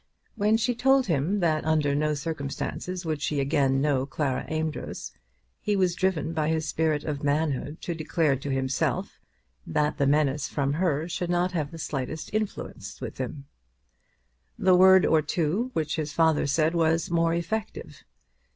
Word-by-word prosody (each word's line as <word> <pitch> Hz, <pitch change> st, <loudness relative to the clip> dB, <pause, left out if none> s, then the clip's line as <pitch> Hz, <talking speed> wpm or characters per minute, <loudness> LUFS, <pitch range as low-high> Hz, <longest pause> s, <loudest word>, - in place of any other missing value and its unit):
When 215 Hz, 0 st, +3 dB
she 235 Hz, +2 st, +1 dB
told 265 Hz, +2 st, +3 dB
him 175 Hz, +4 st, 0 dB
that 155 Hz, -3 st, +1 dB
under 155 Hz, -2 st, +2 dB
no 150 Hz, +1 st, +1 dB
circumstances 160 Hz, +4 st, -4 dB
would 155 Hz, -2 st, -2 dB
she 150 Hz, -1 st, -1 dB
again 135 Hz, -1 st, +2 dB
know 135 Hz, -2 st, +1 dB
Clara 140 Hz, -2 st, -2 dB
Amedroz, 155 Hz, -1 st, -4 dB, 0.5 s
he 210 Hz, -, 0 dB
was 185 Hz, -3 st, +2 dB
driven 175 Hz, -4 st, 0 dB
by 155 Hz, -2 st, 0 dB
his 160 Hz, -1 st, 0 dB
spirit 155 Hz, -2 st, 0 dB
of 145 Hz, -2 st, -3 dB
manhood 145 Hz, 0 st, -1 dB
to 175 Hz, -, -2 dB
declare 155 Hz, -2 st, +1 dB
to 135 Hz, +2 st, -6 dB
himself 130 Hz, -1 st, -1 dB, 0.5 s
that 150 Hz, -, 0 dB
that 140 Hz, -1 st, +3 dB
menace 145 Hz, -1 st, +2 dB
from 140 Hz, -1 st, -1 dB
her 160 Hz, -2 st, 0 dB
should 175 Hz, 0 st, -3 dB
not 175 Hz, +1 st, +1 dB
have 155 Hz, -5 st, -2 dB
the 165 Hz, -, -10 dB
slightest 150 Hz, +2 st, -4 dB
influence 215 Hz, -1 st, -4 dB
on -, -, -5 dB
him. 135 Hz, +2 st, -5 dB, 1.1 s
The 185 Hz, 0 st, +4 dB
word 190 Hz, +1 st, +7 dB
or 160 Hz, -1 st, +4 dB
two 170 Hz, -, -1 dB
which 155 Hz, -4 st, -1 dB
his 150 Hz, -2 st, -3 dB
father 160 Hz, -3 st, +3 dB
said 155 Hz, +3 st, +2 dB
was 165 Hz, 0 st, +1 dB
more 165 Hz, 0 st, +2 dB
effective. 210 Hz, +6 st, -4 dB
155 Hz, 160 wpm, -26 LUFS, 145-175 Hz, 1.1 s, word